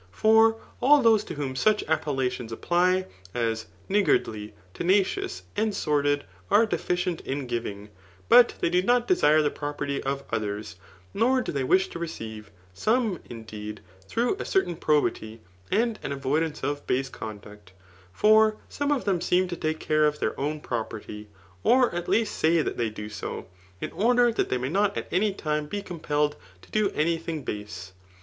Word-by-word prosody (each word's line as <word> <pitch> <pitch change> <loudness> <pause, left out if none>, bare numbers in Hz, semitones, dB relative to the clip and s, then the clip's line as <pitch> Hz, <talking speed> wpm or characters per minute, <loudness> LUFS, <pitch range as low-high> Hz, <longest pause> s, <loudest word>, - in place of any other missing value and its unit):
For 220 - +4 0.2
all 280 +2 +6
those 220 -2 +5
to - - -6
vrhom 140 -3 -3
such 215 +9 +2
appellations 135 -6 -1
a{Y>ty^ 180 +9 +1 0.3
as, 115 -2 -1 0.2
niggardly, 120 - +1 0.2
tenacious, 200 - 0
and 215 -1 0
sordid, 145 -1 +1 0.3
are 225 - +5
deficient 180 -4 -1
in 135 0 -4
giving 105 -4 -4 0.2
} 90 +1 -28
but 240 0 +7
they - - +1
do 180 +1 +3
not 240 +4 +2
desh^ 155 - +4
the 145 - +1
property 145 -1 -3
of 140 0 -3
others, 105 -3 -3 0.4
nor 250 +5 +3
do - - -3
they 140 -2 -1
wish 185 +9 +3
to - - -7
receive, 110 -10 -6 0.2
some, 220 - +1
indeed, 105 -2 -8 0.3
through 235 - +1
a - - -4
cec^ 385 - +2
tain 175 - -5
probity, 145 -8 0 0.3
and 230 0 +1
an - - -4
avoidance 145 +3 -1
of 145 0 -3
base 130 +1 0
cciUiuct* 105 -2 -9 0.4
For 215 - +4
some 285 0 -2
c^ 290 -3 +1
them 190 -4 0
seem 180 +1 +2
to 175 - -3
take 155 -1 -2
care 155 0 +2
of 150 0 -1
their - - -1
own 150 +2 -2
propeityy 110 -3 -5 0.3
or 250 - +4
at 175 0 -4
least 225 -2 +1
say 160 0 +3
that - - -3
they 115 -2 0
do 105 0 -7
so, 105 - -6 0.3
in - - -4
order 240 +2 +3
that 225 - -1
they 130 - +1
may 125 +1 -3
nee 200 +5 +2
at - - -4
any 200 +4 +2
time 150 -5 -2
be 205 +5 -4
compelled 150 -5 -1 0.3
to - - -18
do 215 -2 +2
any 165 +2 +1
thing 160 -3 -5
base. 105 -5 -6
155 Hz, 175 wpm, -26 LUFS, 125-205 Hz, 0.4 s, but